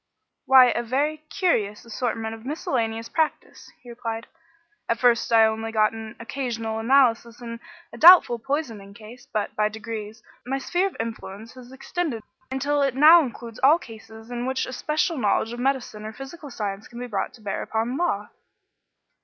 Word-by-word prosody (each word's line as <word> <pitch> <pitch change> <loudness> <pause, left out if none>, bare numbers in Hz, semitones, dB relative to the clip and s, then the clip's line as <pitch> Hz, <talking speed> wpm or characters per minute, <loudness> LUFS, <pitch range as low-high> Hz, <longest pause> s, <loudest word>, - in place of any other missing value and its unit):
"Why, 260 -2 +8
a - - -1
very 280 +6 -1
curious 225 - 0
assortment 225 -1 -3
of 225 0 -10
miscellaneous 230 -5 -2
practice," 315 +3 -3
he 245 - -13
replied. 230 -1 -5 0.6
"At 230 - +2
first 240 0 +2
I 225 -1 +7
only 220 0 -2
got 215 0 +2
an 225 0 -8
occasional 230 -2 -4
analysis 235 -1 +2
in 230 -1 -7 0.3
a - - -10
doubtful 340 -9 +8
poisoning 225 -7 -4
case, 230 +3 -13
but, 210 -1 -2
by 210 0 +2
degrees, 220 0 -7 0.2
my 265 +2 -2
sphere 355 +7 0
of 390 - -9
influence 225 -1 -6
has 255 -1 -13
extended 270 -2 -4 0.3
until 285 +2 0
it 275 -2 +1
now 315 +5 +8
includes 235 -4 -7
all 290 +5 +6
cases 225 - -13
in 245 +1 -3
which 260 0 -1
a 260 - -7
special 305 +3 -1
knowledge 220 +1 +1
of 240 - -7
medicine 250 -5 -2
or 215 +1 -6
physical 285 +4 -9
science 205 -4 -5
can 235 - -13
be 245 - -5
brought 205 -5 -3
to 230 - -19
bear 205 -2 -3
upon 225 +3 -2
law." 275 -11 -1
235 Hz, 170 wpm, -24 LUFS, 220-270 Hz, 0.6 s, Why